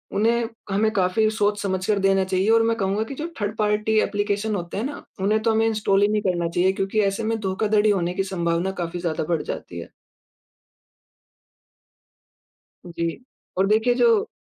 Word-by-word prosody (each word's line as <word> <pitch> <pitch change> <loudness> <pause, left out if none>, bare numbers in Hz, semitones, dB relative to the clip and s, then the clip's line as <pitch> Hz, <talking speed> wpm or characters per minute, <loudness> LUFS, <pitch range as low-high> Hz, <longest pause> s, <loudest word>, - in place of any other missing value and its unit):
उन्हें 230 +2 +2 0.2
हमें 215 +2 +2
काफ़ी 200 +3 +2
सोच 210 -1 0
समझ 190 -1 -2
कर 210 -2 +2
देना 195 0 +3
चाहिए। 190 +2 0
और 225 0 +5
मैं 230 0 +1
कहूँगा 200 +2 0
की 270 +5 -7
जो 315 +4 -4
थर्ड-पार्टी 210 +1 0
ऐप्लीकेशन 205 +1 -1
होते 175 +1 -5
हैं 215 - -1
ना, 285 - -6 0.2
उन्हें 215 +2 +2
तो 225 - +3
हमें 220 0 +2
इंस्टॉल 210 -3 +1
ही 205 - +5
नहीं 210 0 +1
करना 175 -3 0
चाहिए 180 +2 +2
क्योंकि 195 +3 -1
ऐसे 210 +3 -4
में 225 0 -1
धोखाधड़ी 210 +2 +1
होने 180 -3 +1
की 195 - -1
संभावना 170 +1 0
काफ़ी 170 +1 -5
ज़्यादा 160 -3 -1
बढ़ 165 -3 +1
जाती 85 - -6
है। 85 - -9 3.0
जी। 170 +8 -3 0.3
और 195 +1 +3
देखिए 220 +4 +3
जो 450 - +3
205 Hz, 175 wpm, -23 LUFS, 190-220 Hz, 3.0 s, और